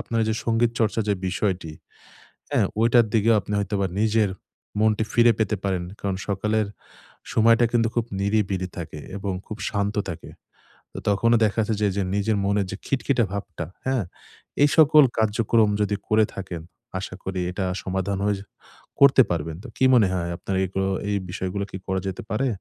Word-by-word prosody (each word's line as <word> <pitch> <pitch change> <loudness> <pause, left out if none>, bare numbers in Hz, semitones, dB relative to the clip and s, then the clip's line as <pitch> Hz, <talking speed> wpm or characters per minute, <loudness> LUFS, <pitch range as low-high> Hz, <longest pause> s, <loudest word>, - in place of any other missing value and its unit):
আপনার 115 -1 -2
যে 110 - +1
সংগীত 115 0 +2
চর্চার 110 0 +1
যে - - +3
বিষয়টি। 90 -4 -2 0.8
হ্যাঁ, - - +3 0.2
ওইটার 115 0 +5
দিকেও 115 +1 +4
আপনি 105 - -6
হয়তোবা 100 -1 -1
নিজের 110 -1 +2 0.5
মনটি 110 0 +3
ফিরে 120 0 +6
পেতে 110 -1 +1
পারেন। 95 -3 -1 0.2
কারণ 100 -2 -2
সকালের 105 +1 0 0.7
সময়টা 115 +1 +5
কিন্তু 115 -1 +3
খুব 120 -1 +1 0.2
নিরিবিরি 100 -2 0
থাকে 75 -3 -6 0.2
এবং 100 -1 -3
খুব 105 - -6
শান্ত 100 0 -1
থাকে। 85 - -7 0.6
তো - - -9
তখনো 115 +4 +3
দেখাচ্ছে 110 +1 0
যে, - - +3
এইযে 100 +1 -1
নিজের 105 +1 +1
মনের 100 0 +1
যে - - -4
খিটখিটে 130 -2 +1
ভাবটা, 95 -5 -5 0.2
হ্যাঁ? 130 -4 +1 0.6
এই 145 - +5
সকল 155 -1 +7
কার্যক্রম 110 0 +2
যদি 105 0 +1
করে 110 0 +4
থাকেন। 90 -4 -6 0.4
আশা 95 0 -6
করি 95 -1 -3
এটা 95 +1 -2 0.2
সমাধান 95 +1 -2
হয়ে 105 -1 +2
যে 100 - -11 0.5
করতে 140 -1 +7
পারবেন। 80 -1 -2
তো - - -8
কি 130 - +3
মনে 110 -6 +6
হয়? 85 -2 -2
আপনার 95 +2 -4
এই 95 - 0
গ্র 95 - 0
এইগুলো - - 0 0.2
এই 100 - +1
বিষয়গুলো 95 +2 -3
কি - - -5
করা 95 0 0
যেতে 95 - -4
পারে? 130 +5 +1
105 Hz, 175 wpm, -24 LUFS, 95-115 Hz, 0.8 s, সকল